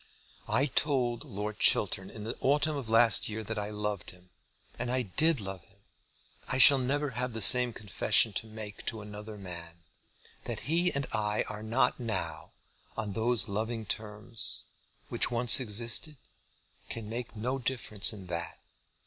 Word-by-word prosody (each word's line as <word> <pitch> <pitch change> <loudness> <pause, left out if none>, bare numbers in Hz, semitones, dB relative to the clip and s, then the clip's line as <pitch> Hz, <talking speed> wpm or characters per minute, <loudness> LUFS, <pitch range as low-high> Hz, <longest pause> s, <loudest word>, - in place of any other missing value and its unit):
I 120 +6 +2
told 130 -5 0
Lord 105 +2 -5
Chiltern 95 0 +3
in 105 - -8
the 115 - -4
autumn 150 +3 +2
of 135 -6 -5
last 115 -1 +4
year 110 +1 -5
that 105 - -4
I 105 0 -3
loved 105 -2 -4
him. 90 0 -16 0.5
And 120 +1 -3
I 130 0 0
did 155 - +2
love 95 -3 -7
him. 100 - -28 0.7
I 130 - 0
shall 135 +1 +9
never 140 +3 -1
have 125 +1 -3
the 110 - -4
same 125 +3 +5
confession 105 0 +2
to 110 - -2
make 110 -1 -9
to 110 -2 -3
another 105 +1 -9
man. 85 -3 -8 0.6
That - - -5
he 170 +4 +2
and 140 0 -2
I 105 0 0
are 105 - -7
not 115 +6 +1
now, 95 - -4 0.5
on 105 -2 -3
those 115 0 +2
loving 110 +2 -3
terms, 105 +2 -2 0.5
which - - +3
once 120 +1 +6
existed, 115 +5 -2 0.7
can 115 -2 -6
make 115 +1 -6
no 125 +5 -2
difference 120 -5 +1
in 100 -4 -9
that. 85 -1 -5
110 Hz, 160 wpm, -30 LUFS, 105-125 Hz, 0.7 s, shall